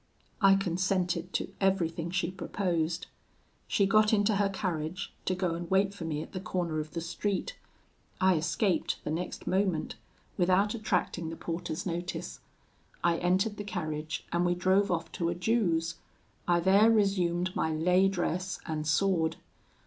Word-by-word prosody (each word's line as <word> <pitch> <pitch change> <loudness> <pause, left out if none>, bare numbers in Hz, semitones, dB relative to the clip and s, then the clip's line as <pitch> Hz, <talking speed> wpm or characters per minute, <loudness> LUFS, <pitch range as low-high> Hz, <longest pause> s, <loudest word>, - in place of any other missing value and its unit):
I 195 -1 +7
consented 185 -1 0
to 190 - -2
everything 170 -4 +1
she 175 0 -1
proposed. 175 -3 -1 0.6
She 200 - +2
got 215 +2 +4
into 205 -1 +3
her 200 -1 +2
carriage 180 -3 -3
to 185 - +1
go 180 -2 0
and 170 0 -5
wait 195 +1 +3
for 185 -5 -7
me 155 -1 -2
at - - -13
the 185 - -4
corner 180 -4 -2
of 155 0 -6
the 165 - -3
street. 200 - -2 0.6
I 190 -1 +5
escaped 170 +2 0
the - - -3
next 170 +3 -4
moment, 185 -4 0 0.4
without 185 +3 +3
attracting 180 -6 -1
the 165 - -5
porter's 165 -1 -4
notice. 175 0 -4 0.6
I 170 -1 +3
entered 190 +4 +1
the 205 - -4
carriage, 155 -6 -4
and 175 +1 +1
we 175 0 +2
drove 190 +3 +3
off 170 -1 -1
to 170 -1 -1
a 170 - -1
Jew's. 175 -4 +1 0.5
I 175 -1 +3
there 195 +5 +6
resumed 185 -4 +2
my 160 - 0
lay 180 +4 +3
dress 185 -1 -2
and 155 -1 -3
sword. 165 0 +2
180 Hz, 155 wpm, -30 LUFS, 165-195 Hz, 0.6 s, I